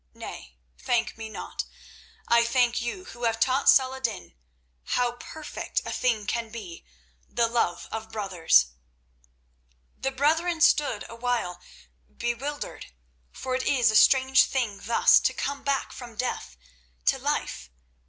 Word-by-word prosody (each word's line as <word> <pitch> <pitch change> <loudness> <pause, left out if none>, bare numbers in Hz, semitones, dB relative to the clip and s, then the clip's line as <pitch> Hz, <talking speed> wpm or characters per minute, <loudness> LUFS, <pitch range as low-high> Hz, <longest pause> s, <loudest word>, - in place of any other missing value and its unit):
Nay, 65 -2 -9 0.2
thank 240 -2 0
me 225 -1 -7
not. - - -5 0.6
I 235 0 +5
thank 240 0 +2
you 305 +11 -4
who 240 -7 -6
have 225 -1 0
taught 265 +3 +3
Salah 260 0 +5
ed 265 - -14
din 210 - -4 0.6
how 245 -1 +2
perfect 300 +5 -5
a - - -4
thing 225 -5 0
can 230 +1 -2
be 210 -7 -9 0.5
the 235 -1 +1
love 230 -7 -1
of 220 0 -6
brothers." 180 - +3 1.3
The 265 - 0
brethren 320 +5 +1
stood 290 -8 +3
awhile 230 -7 -2 0.6
bewildered, 245 +5 -4 0.4
for 260 - -5
it 255 0 -1
is 245 -5 +4
a - - -2
strange 265 +3 +6
thing 230 -7 -2
thus 230 +2 +5
to - - 0
come 280 0 -3
back 280 -1 0
from 240 -3 -10
death 210 - -4 0.5
to - - +3
life. - - -2
240 Hz, 140 wpm, -26 LUFS, 220-265 Hz, 1.3 s, strange